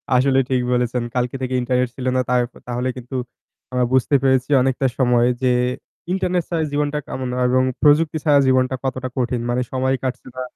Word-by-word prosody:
আসলে 135 +1 +3
ঠিক 130 -1 +1
বলেছেন। 125 0 0
কালকে 125 +1 -1
থেকে 130 0 -2
ইন্টারনেট 125 0 0
ছিল 130 - -6
না। 130 - +3
তার 125 0 +3 0.3
তাহলে 125 +1 -2
কিন্তু 125 +2 -8 0.6
আমরা 125 -1 +1
বুঝতে 130 +2 +3
পেরেছি 130 0 +2
অনেকটা 130 +1 +1
সময় 120 -2 +3
যে 130 -1 +3 0.6
ইন্টারনেট 180 -2 0
ছাড়া 165 -2 0
জীবনটা 145 0 -1
কেমন 130 -1 -4
না 125 - -3
এবং 130 +1 +3 0.2
প্রযুক্তি 155 +1 +4
ছাড়া 145 -2 +5
জীবনটা 130 0 +2
কতটা 130 -1 -3
কঠিন। 125 -1 -1
মানে 120 +1 +1
সময় 130 0 +1
কাটছে 130 -1 -4
না। - - -3
130 Hz, 180 wpm, -20 LUFS, 125-135 Hz, 0.6 s, ছাড়া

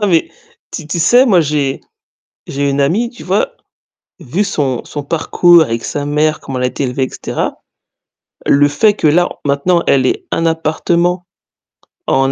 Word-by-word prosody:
Non 210 - +1
mais, 165 -3 +2 0.4
tu 155 - -7
tu 170 +2 -3
sais, 245 +10 +5
moi 185 -7 +4
j'ai 145 -3 -1 0.7
j'ai 140 0 -1
une 140 - -1
amie, 195 +12 +1
tu 240 - -13
vois, - - -1 0.6
vu 170 +7 -1
son 140 -10 -2
son 145 - -6
parcours 170 +2 +4
avec 115 -5 -3
sa 145 -1 -3
mère, 150 +1 +1
comment 130 -1 -6
elle 125 - 0
a - - +2
été 140 - -4
élevée, 130 +1 -1
et - - -8
cetera, - - -4 0.9
le 145 +1 +4
fait 205 +9 +2
que 160 - -1
là 175 +4 +3 0.2
maintenant 145 +5 +1
elle 130 -2 +3
ait - - -1
un 165 - 0
appartement 170 +2 0 0.8
en 135 0 +2
155 Hz, 175 wpm, -15 LUFS, 140-175 Hz, 0.9 s, sais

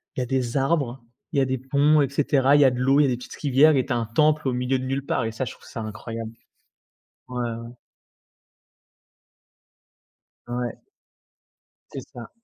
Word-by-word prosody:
il - - -3
y - - 0
a - - -3
des 125 -1 -1
arbres, 135 -3 0 0.3
il 140 - +2
y - - +4
a - - +3
des 130 0 -1
ponts, 140 +4 +3
et 140 - +2
cetera. 140 -1 +3
Il 145 - +5
y 135 -2 +6
de 125 - -4
l'eau, 135 +3 +4
il - - +4
a - - +2
des 120 - -1
petites 125 - -10
rivières 145 +2 +4
et 130 - +1
tu 135 - -7
as 120 - +2
un 115 - -1
temple 150 +5 +2
au 130 - +1
milieu 125 +1 0
de 130 - -5
nulle 135 +1 -2
part - - 0
et 110 - -2
ça 115 - -3
je 120 - -4
trouve - - -19
ça 115 - -6
incroyable. 110 +1 -6 1.0
Ouais, 125 -1 -5
ouais. 115 -1 -4 2.8
Ouais. 120 -1 -4 1.1
C'est - - -5
ça. 120 -2 -9
130 Hz, 205 wpm, -24 LUFS, 120-140 Hz, 2.8 s, y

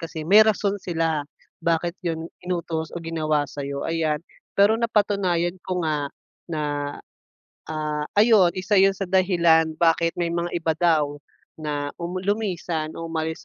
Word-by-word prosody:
kasi 160 -2 -6
may 205 +5 +8
rason 205 -1 +1
sila 165 -3 -1 0.4
bakit 170 +1 0
‘yon 165 -1 -2 0.2
inutos 170 -3 -3
o 175 - -3
ginawa 155 -2 0
sa’yo, 140 0 -4
ayan. 160 -2 0 0.4
Pero 205 +2 +6
napatunayan 200 -6 +1
ko 180 -1 -2
nga 150 -2 0 0.4
na, 155 -2 -2 1.1
ah, 150 -1 -2
ayun, 210 -5 +6
isa 200 +3 0
yun 195 0 +5
sa 195 - -3
dahilan 170 -4 +3
bakit 165 0 +3
may 170 - +1
mga 170 0 -1
iba 165 -1 0
daw 155 -4 +2 0.4
na 145 -1 -3
um 175 +2 -3
lumisan 180 -6 -2
o 165 - -4
umalis 160 0 -3
165 Hz, 145 wpm, -24 LUFS, 160-185 Hz, 1.1 s, may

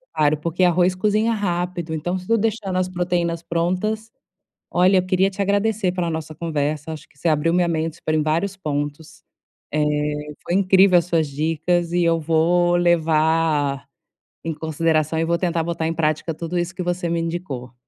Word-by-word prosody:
claro 150 0 +3
porque 170 +4 -1
arroz 180 +1 +3
cozinha 215 +4 +1
rápido, 175 -5 -2
então, 175 +4 -2
se 185 - -10
eu 230 - +4
deixando 210 -4 -1
as 185 0 0
proteínas 175 -2 -1
prontas 185 +6 -1 0.6
olha, 185 +2 +4
eu 185 - +1
queria 185 +1 +2
te 195 +1 -5
agradecer 200 -1 +1
pela 175 -2 -1
nossa 160 -1 -5
conversa, 155 -1 -2
acho 155 - -8
que - - -29
você 170 - 0
abriu 155 +2 +2
minha 175 -1 +2
mente, 160 0 -2
foram 155 0 +1
em 150 - +1
vários 175 +5 -1
pontos, 145 -1 -4 0.5
eh, 155 - +1 0.6
foi 175 - -1
incrível 190 -1 +5
as 170 - -4
suas 165 -3 +1
dicas 165 +4 -1
e 175 - +2
eu 165 -1 +2
vou 170 +2 +2
levar 160 -4 +2 0.6
em 165 - -2
consideração 160 0 0
e 165 - +1
vou 170 +1 0
tentar 170 -2 0
botar 165 -1 -2
em 165 - -1
prática 155 0 -1
tudo 175 +2 -3
isso 175 +2 -3
que 180 - -3
você 175 -1 -2
me 170 - 0
indicou. 165 -7 -4
170 Hz, 180 wpm, -22 LUFS, 160-180 Hz, 0.6 s, incrível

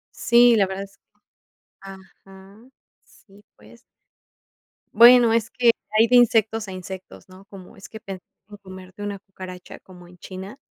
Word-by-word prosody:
Sí, 240 0 +4
la 200 -3 +1
verdad 190 +1 -6
es 195 0 -16
que, - - -68 0.8
ajá, 195 +1 -16 0.5
si 200 -1 -23
pues 110 +2 -19 1.1
bueno, 240 +1 +6
es 225 -1 -1
que 240 -2 +2 0.3
hay 225 +1 +4
de 250 +1 +4
insectos 225 -2 +1
a - - -8
insectos, 185 +1 -11
¿no? 185 +1 -17
Cómo 195 -3 -15
es 195 - -13
que 220 - -13
pensar 190 -3 -10 0.2
en 205 - -13
comerte 185 -1 -14
una 205 -1 -6
cucaracha 185 -2 -12
como 180 -2 -17
en 180 - -19
China. 190 +6 -11
195 Hz, 155 wpm, -21 LUFS, 185-220 Hz, 1.1 s, bueno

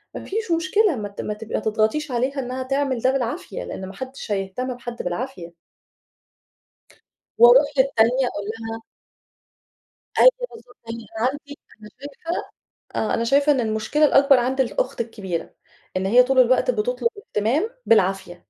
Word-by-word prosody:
ما - - -6
فيش 435 -2 -3
مشكلة، 335 +2 +2
ما 205 -2 -4
ت 200 - -7
ما 210 - -3
ت 210 +1 -9
ما - - -2
تضغطيش 220 +8 0
عليها 260 +3 -1
إنها 255 0 -4
تعمل 270 -1 -1
ده 260 - +3
بالعافية، 275 - -3
لإن 190 - -6
ما 190 - -9
حدش 260 -1 -8
هيهتم 200 +6 -2
بحد 240 -1 -7
بالعافية." 180 -2 -5 1.8
وأرُوح 245 +5 +7
للتانية 255 -1 +3
أقول 205 -4 -5
لها 225 0 -6 1.4
أيوة - - +9 0.2
بالضبط، 245 - -15
أنا 230 0 -3
عندي 285 +1 -9 0.2
أنا 210 - -12
شايفة 290 +5 -5 0.5
آه، 220 - 0
أنا 230 - 0
شايفة 280 +4 +4
إن 270 - +1
المشكلة 220 +7 0
الأكبر 275 -2 +5
عند 260 +2 0
الأخت 380 - -1
الكبيرة، 200 -7 -4 0.4
إن 190 +1 0
هي 245 +5 +6
طُول 260 +1 0
الوقت 255 - +4
بتطُلب - - 0
اهتمام 290 - -1 0.2
بالعافية. 195 -4 +2
250 Hz, 150 wpm, -22 LUFS, 220-285 Hz, 1.8 s, أيوة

